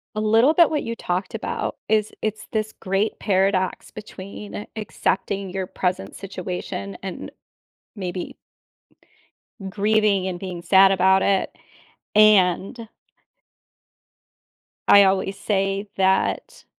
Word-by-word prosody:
A 215 - -1
little 225 +7 +4
bit 340 -1 +5
what 300 - -1
you 230 0 -5
talked 185 +5 -3
about 220 - -3
is 215 0 +1
it's 215 0 -3
this 215 -1 -2
great 195 +3 -1
paradox 190 -2 0
between 205 0 -9
accepting 200 -2 -2
your 190 0 -3
present 180 - -3
situation 185 0 -6
and 190 -2 -6 0.7
maybe 180 -2 -5 1.3
grieving 205 -1 +1
and 180 -1 -4
being 180 -2 -6
sad 195 +1 +6
about 190 0 +4
it, 195 -1 0 0.6
and 210 +1 +4 2.0
I 200 0 +9
always 195 0 0
say 195 0 -1
that 190 0 0
195 Hz, 105 wpm, -22 LUFS, 190-215 Hz, 2.0 s, I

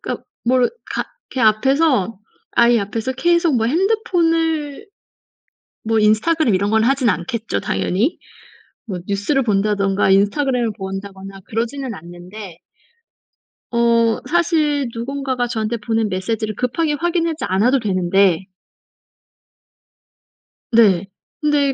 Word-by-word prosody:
그러니까 - - -5 0.2
뭘 250 +1 +3 0.2
가 - - -1 0.3
걔 - - -5
앞에서 230 - +2 0.4
아이 235 0 +5
앞에서 225 +5 -3
계속 340 +1 +2
뭐 225 - +1
핸드폰을 330 - 0 1.0
뭐 225 0 0
인스타그램 220 +5 +3
이런 200 +2 +1
건 220 +1 +2
하진 260 -1 +2
않겠죠 175 - -2
당연히. 185 - -1 0.7
뭐 190 -4 -4
뉴스를 205 +8 0
본다든가 200 -2 +1
인스타그램을 230 +4 +2
본다거나 195 0 -7
그러지는 235 +3 -3
않는데. 175 +2 -10 1.1
어 235 -1 +2
사실 305 -5 +1
누군가가 260 +1 -2
저한테 225 0 -2
보낸 225 0 -1
메시지를 215 +3 -2
급하게 295 +5 -1
확인하지 330 -2 -1
않아도 230 +9 +2
되는데 190 -2 +2 2.3
네. 200 -5 +4 0.4
근데 290 -2 +2
230 Hz, 265 characters per minute, -19 LUFS, 200-280 Hz, 2.3 s, 아이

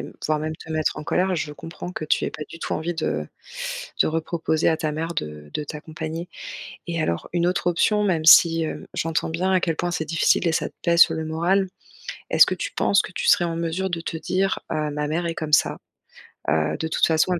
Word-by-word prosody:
m - - -7
voire 155 0 +1
même 155 +1 -3
te 160 - -12
mettre 155 -1 0
en - - -5
colère. 185 +5 +1
Je 155 -3 -3
comprends 165 +3 -8
que 170 - -5
tu 155 - +1
aies - - -2
pas 150 - -7
du 165 - -9
tout - - -3
envie 165 +3 -2
de 75 - -2 0.8
de - - 0
reproposer 160 0 0
à 160 - +2
ta 155 -1 -2
mère 165 +2 -3
de 75 - -5
de 150 - -2
t'accompagner. 160 +3 -6 0.6
Et 170 -1 -2
alors 85 - -2
une 175 0 +1
autre 180 0 +1
option 210 +5 +2
même 165 -5 0
si, 165 0 +8
hem, 155 - -5
j'entends 165 -1 -1
bien 180 +4 0
à 185 - +4
quel 165 -3 -1
point 175 - -1
c'est 165 -2 -2
difficile 165 +2 +2
et - - +1
ça - - 0
te - - -28
pèse 170 0 +3
sur 165 - +4
le 160 0 -3
moral, 175 +5 +1 0.6
est-ce - - +7
que - - -1
tu - - -4
penses 200 0 +3
que - - -8
tu 165 - -3
serais 175 - +5
en 165 -1 -2
mesure 170 +3 -2
de 165 -1 -2
te 165 - -4
dire, 185 +4 0
heu, 155 -1 -1
ma 150 0 -2
mère 170 +3 -1
est 165 - -3
comme 155 -1 -4
ça. - - +4 0.7
Heu, 80 0 +1
de 160 - -2
toute 160 - +2
façon, 160 +3 +2
elle 175 - -1
165 Hz, 240 wpm, -23 LUFS, 155-175 Hz, 0.8 s, si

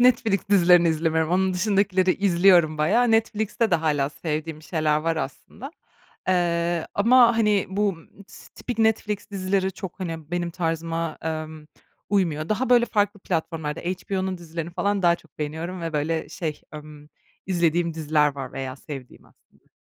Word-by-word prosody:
Netflix 225 -5 +2
dizilerini 175 -3 +6
izlemiyorum. 160 0 0
Onun 185 +1 +1
dışındakileri 190 -1 +2
izliyorum 175 -4 +4
bayağı. 225 +10 +3
Netflix'te 220 0 +1
de - - +4
hâlâ 150 -4 +1
sevdiğim 155 0 -4
şeyler 155 -2 0
var 165 +1 -1
aslında, 205 - -6 0.6
eee, 170 -2 +1
ama, 235 +2 +5
hani, 210 -3 +2
bu, 205 +2 +1
ımm, 190 +2 -9
tıs 200 - -15
tipik 245 -2 -7
Netflix 215 -2 0
dizileri 190 -1 -1
çok, 190 +1 -8
hani, 165 -3 -5
benim 175 -1 -2
tarzıma, 165 -1 -3
emm, 155 -1 -5 0.4
uymuyor. 165 -6 0
Daha, 230 +4 -1
böyle, 240 -1 +6
farklı 205 -2 0
platformlarda 160 -3 -3
HBO'nun 185 +1 -3
dizilerini 170 0 -6
falan 200 +3 -1
daha 170 -1 +4
çok 165 - -24
beğeniyorum 160 +4 -4
ve, 165 -1 -4
böyle, 155 +2 -1
şey, 155 -4 -5
ımm, 150 0 -11 0.4
izlediğim 170 -2 +1
diziler 150 -2 +1
var 135 -2 -6
veya 130 -1 -5
sevdiğim 135 -3 -10
aslında. - - -29
170 Hz, 150 wpm, -24 LUFS, 160-200 Hz, 0.6 s, dizilerini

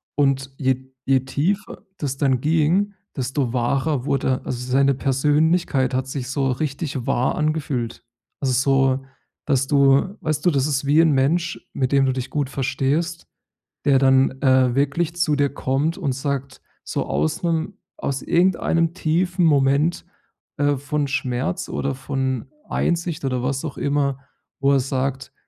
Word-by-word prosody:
Und 135 -1 +1
je 130 -1 -1
je 135 -1 +3
tiefer 155 +10 -2
das 135 -2 -3
dann 130 -3 +1
ging, 165 +7 +2 0.2
desto 130 -1 -1
wahrer 135 +3 0
wurde 130 -2 0
also 125 0 -4
seine 140 +1 +4
Persönlichkeit 145 0 +1
hat 130 +1 -1
sich 130 -2 -5
so 135 -1 0
richtig 140 -1 -3
wahr 125 +2 +1
angefühlt. 150 -6 -2 0.4
Also 135 -2 +1
so, 135 0 +2 0.4
dass 135 -2 +1
du 140 +6 +3
weißt 155 -2 -2
du, 175 - +6
das 135 -3 +1
ist 140 -1 -1
wie 145 +3 +4
'n 160 -2 +4
Mensch, 165 +6 0
mit 130 -1 -1
dem 135 -1 +4
du 130 - +2
dich 130 -1 -4
gut 145 -3 -1
verstehst, 140 +5 -1 0.6
der 140 -2 +5
dann, 135 0 +3
äh, 130 -2 +4
wirklich 150 +5 0
zu 170 -4 +1
dir 140 -1 +2
kommt 140 +5 -1
und 150 -9 -1
sagt, 140 0 -4 0.2
so - - -3
aus 75 - -1
'nem 165 +3 -1 0.2
aus 135 -1 -3
irgendeinem 170 -2 +2
tiefen 175 +1 +1
Moment, 145 +2 +2 0.5
äh, 145 0 +2
von 145 +1 -2
Schmerz 135 +6 -2
oder 135 -1 -2
von 130 -2 -2 0.2
Einsicht 170 -4 -1
oder 130 -2 -1
was 135 +3 -2
auch 145 - -6
immer, 140 -2 0 0.4
wo 140 0 +3
er 135 - +4
sagt: 135 0 -3
140 Hz, 155 wpm, -22 LUFS, 130-155 Hz, 0.6 s, du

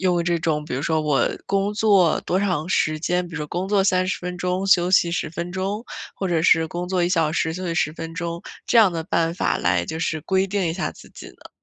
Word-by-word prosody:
用 180 -2 +2
这 170 0 0
种 155 -2 -1
比 150 - -5
如 130 - -3
说 160 0 +1
我 145 -5 +2 0.2
工 200 +1 0
作 200 -6 +3
多 185 - -1
长 180 -5 -1
时 155 -4 +1
间， 180 +2 0
比 170 - -11
如 150 -2 -4
工 180 +4 -3
作 200 0 +2
30 185 -1 +1
分 180 0 -5
钟， 180 +2 -1
休 180 -2 +4
息 175 -2 +4
10 170 -2 -2
分 170 +2 -5
钟， 195 +4 -3 0.3
或 190 - -3
者 170 -2 +1
是 165 -1 +4
工 175 +2 -4
作 180 -1 0
1 175 - +2
小 165 -4 +1
时， 160 -1 0
休 185 +2 -5
息 170 - -2
10 155 -1 0
分 165 0 -7
钟， 170 -1 -4 0.3
这 - - +2
样 200 -5 +6
的 165 - -3
办 165 -2 0
法 - - 0
来 90 0 +1
就 160 - -5
是 160 -1 -2
规 190 +4 +1
定 195 -1 -1
一 165 - -1
下 185 +3 -3
自 - - -15
己 - - -11
呢？ - - -16
175 Hz, 255 characters per minute, -22 LUFS, 160-190 Hz, 0.3 s, 样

